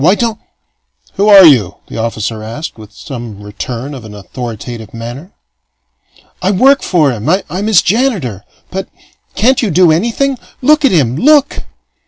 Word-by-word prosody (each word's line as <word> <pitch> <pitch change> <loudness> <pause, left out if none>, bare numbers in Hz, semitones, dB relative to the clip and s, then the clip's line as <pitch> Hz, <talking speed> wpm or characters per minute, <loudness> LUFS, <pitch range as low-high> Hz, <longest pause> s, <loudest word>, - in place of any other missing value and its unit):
Why 180 +7 +4
don't 230 -1 -2 0.4
" - - -37
"Who 205 +2 +3
are 195 -3 +9
you?" 120 - +4
the - - -8
officer 110 -1 -3
asked, 115 +9 -7
with 110 -2 -13
some 115 -6 -9
return 120 +6 -6
of 130 -4 -9
an 105 -1 -11
authoritative 115 +1 -8
manner. 120 - -8 1.1
"I 185 - 0
work 265 +8 +4
for 155 -7 +2
him. 115 +3 -4
I'm 185 +2 -1
his 215 -5 +4
janitor. 190 - -1 0.3
But 190 0 -5 0.5
can't 255 +5 +2
you 225 - 0
do 180 -1 +4
anything? 235 - 0 0.2
Look 300 +3 +3
at 275 - +4
him! 135 -8 +1
Look!" 285 - +3
155 Hz, 160 wpm, -13 LUFS, -, 1.1 s, are